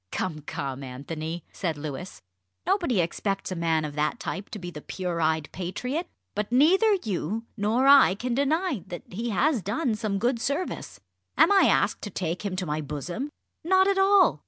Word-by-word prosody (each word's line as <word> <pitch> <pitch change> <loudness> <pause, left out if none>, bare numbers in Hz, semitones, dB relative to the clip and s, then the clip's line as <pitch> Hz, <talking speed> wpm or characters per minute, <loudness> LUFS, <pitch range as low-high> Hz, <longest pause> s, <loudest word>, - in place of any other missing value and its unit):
"Come, 160 -5 -2
come, 135 -2 -5
Anthony!" 155 +5 -5
said 165 -5 -2
Louis, 150 +4 -7 0.4
"nobody 335 - +2
expects 195 +4 -2
a - - -2
man 165 -2 +1
of 150 - -5
that 150 +1 -1
type 195 +3 -5
to - - -6
be 175 -3 -6
the 150 - -8
pure 175 -1 -3
eyed 160 -1 +1
patriot. 250 - -3 0.3
But 210 +2 -3
neither 380 - +5
you 210 +2 -2
nor 225 +4 +1
I 275 -8 +7
can 245 +4 -2
deny 285 - +1
that 175 -2 -7
he 230 +6 -3
has 255 +4 +2
done 225 - 0
some 210 -2 -1
good 240 +2 0
service. 285 +9 -3 0.4
Am - - +6
I 395 -1 +6
asked - - +2
to 205 - -5
take 175 -1 -3
him 200 -3 -2
to 185 0 -2
my 150 -1 -2
bosom? 165 - -4 0.3
Not 375 +3 +4
at 395 -1 +2
all! 390 0 +5
200 Hz, 180 wpm, -26 LUFS, 165-270 Hz, 0.4 s, I